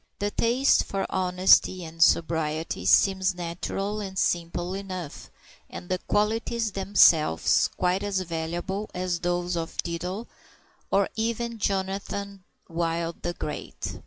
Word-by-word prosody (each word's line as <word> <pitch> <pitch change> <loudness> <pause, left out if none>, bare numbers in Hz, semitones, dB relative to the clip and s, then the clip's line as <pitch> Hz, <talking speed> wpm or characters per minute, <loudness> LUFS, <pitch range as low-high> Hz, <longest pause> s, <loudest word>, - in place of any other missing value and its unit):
The 205 +1 -1
taste 245 +6 +3
for 195 -1 -2
honesty 185 0 +3
and 165 +1 -9
sobriety 160 - +2
seems 190 - +4
natural 180 +4 -3
and 190 -2 -6
simple 175 0 -1
enough, 185 -5 -6 0.4
and 175 - -9
the 185 0 0
qualities 225 +2 0
themselves 180 - +4
quite 180 +1 +1
as 200 -2 -1
valuable 175 +4 -4
as 180 -1 -1
those 175 0 -1
of 165 -1 -4
Diddler, 180 +6 -4 0.6
or 195 0 +3
even 235 +1 -1
of 230 - -9
Jonathan 195 0 -3 0.2
Wild 165 0 -2
the 175 - -2
Great. 150 - -6
185 Hz, 125 wpm, -26 LUFS, 170-200 Hz, 0.6 s, seems